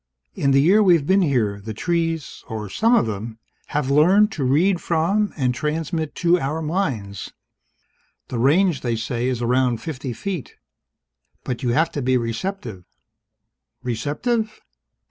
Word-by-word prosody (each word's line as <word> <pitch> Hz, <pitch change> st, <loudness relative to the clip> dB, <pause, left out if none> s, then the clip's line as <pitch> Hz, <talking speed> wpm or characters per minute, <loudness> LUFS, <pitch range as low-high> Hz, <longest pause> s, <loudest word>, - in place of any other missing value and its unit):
In 140 Hz, -, 0 dB
the 135 Hz, 0 st, +5 dB
year 195 Hz, +7 st, +5 dB
we've 175 Hz, -7 st, +4 dB
been 190 Hz, +4 st, +3 dB
here, 120 Hz, -, +1 dB
the 110 Hz, +1 st, -6 dB
trees 165 Hz, -, -2 dB
or 105 Hz, -3 st, -5 dB
some 230 Hz, -, +3 dB
of -, -, +3 dB
them 110 Hz, +1 st, -5 dB, 0.3 s
have 145 Hz, -2 st, -1 dB
learned 190 Hz, +9 st, +5 dB
to 150 Hz, -, -3 dB
read 170 Hz, +8 st, +2 dB
from 185 Hz, +6 st, +1 dB
and 130 Hz, -4 st, +1 dB
transmit 155 Hz, +3 st, -3 dB
to 175 Hz, 0 st, +3 dB
our 150 Hz, +2 st, -2 dB
minds. 140 Hz, -, -3 dB, 1.0 s
The 120 Hz, -, -3 dB
range, 155 Hz, +5 st, +3 dB
they 120 Hz, -2 st, -1 dB
say, 115 Hz, +2 st, -2 dB
is 125 Hz, -2 st, -1 dB
around 125 Hz, 0 st, +2 dB
fifty 135 Hz, -2 st, -5 dB
feet. 170 Hz, -, -5 dB, 0.9 s
But 125 Hz, -1 st, -4 dB
you 125 Hz, -, -1 dB
have 160 Hz, +5 st, +2 dB
to 145 Hz, -, -3 dB
be 130 Hz, 0 st, +2 dB
receptive 115 Hz, -, -4 dB, 0.5 s
" 65 Hz, -, -52 dB
"Receptive?" 150 Hz, -, -2 dB
140 Hz, 150 wpm, -22 LUFS, 120-175 Hz, 1.0 s, the